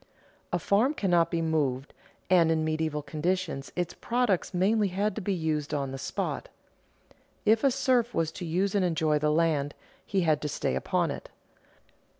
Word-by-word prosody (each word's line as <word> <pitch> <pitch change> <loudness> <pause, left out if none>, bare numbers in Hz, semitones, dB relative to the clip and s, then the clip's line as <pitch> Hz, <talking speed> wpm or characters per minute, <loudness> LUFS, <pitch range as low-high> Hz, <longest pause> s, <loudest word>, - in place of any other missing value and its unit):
A - - +2
farm 235 +9 +2
cannot 175 -7 +2
be 165 -1 -1
moved, 145 -4 -1 0.3
and 175 -3 +5
in 160 -1 +1
medieval 155 -1 -1
conditions 165 -2 -2
its 180 -1 -2
products 235 -6 0
mainly 200 +4 +2
had 200 +3 -1
to 220 - -5
be 200 - -1
used 155 -4 -1
on 140 -2 -2
the 135 - -6
spot. - - -3 1.0
If 220 +1 +4
the 275 - +4
serf 255 -2 +2
was 165 -7 0
to 185 - -8
use 185 +4 0
and 200 -2 +2
enjoy 160 -3 +1
the 150 0 +1
land, 150 -2 +1 0.3
he 195 -2 0
had 155 -3 +2
to 150 - -2
stay - - -1
upon 65 - 0
it. - - -7
170 Hz, 170 wpm, -28 LUFS, 155-200 Hz, 1.0 s, and